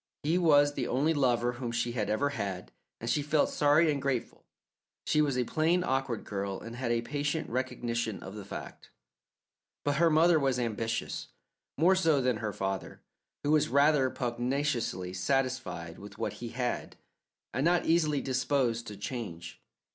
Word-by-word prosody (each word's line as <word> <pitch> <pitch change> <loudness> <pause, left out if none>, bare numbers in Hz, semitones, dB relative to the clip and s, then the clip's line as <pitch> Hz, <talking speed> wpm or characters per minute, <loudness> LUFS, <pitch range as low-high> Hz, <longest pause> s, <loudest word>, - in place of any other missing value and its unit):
He 165 +5 +2
was 145 -4 +5
the 130 -4 -2
only 145 +6 +2
lover 125 -4 +2
whom 120 -1 -5
she 120 0 -1
had 110 -4 -2
ever 125 +7 +1
had, 100 -9 -4 0.3
and 115 - -6
she 120 +5 +2
felt 150 +1 +2
sorry 150 +2 +4
and 140 -2 -2
grateful; 135 -3 -3 0.6
she 150 - +3
was 140 -4 +1
a 125 - +2
plain, 165 +8 +1
awkward 130 - -1
girl, 100 -1 -3
and 115 +1 -8
had 120 -1 -2
a 115 0 +1
patient 145 +4 -2
recognition 120 -3 -2
of 95 - -8
the 105 -1 -7
fact. 100 - -9 1.0
But 145 -1 +1
her 170 +2 +5
mother 160 +1 +5
was 135 -3 +1
ambitious, 115 -1 -2 0.5
more 170 +6 +5
so 165 -6 +3
than 125 -3 +1
her 110 -1 -3
father, 95 0 -4 0.4
who 145 - +1
was 155 -1 +3
rather 140 0 +4
pugnaciously 120 -7 -2
satisfied 95 -7 -1
with 100 +1 -11
what - - -2
he 120 - -4
had, 125 +1 -3 0.6
and 130 - 0
not 175 +2 +3
easily 155 -4 +2
disposed 130 -3 0
to 105 - -7
change. 100 -7 -6
130 Hz, 165 wpm, -30 LUFS, 115-145 Hz, 1.0 s, was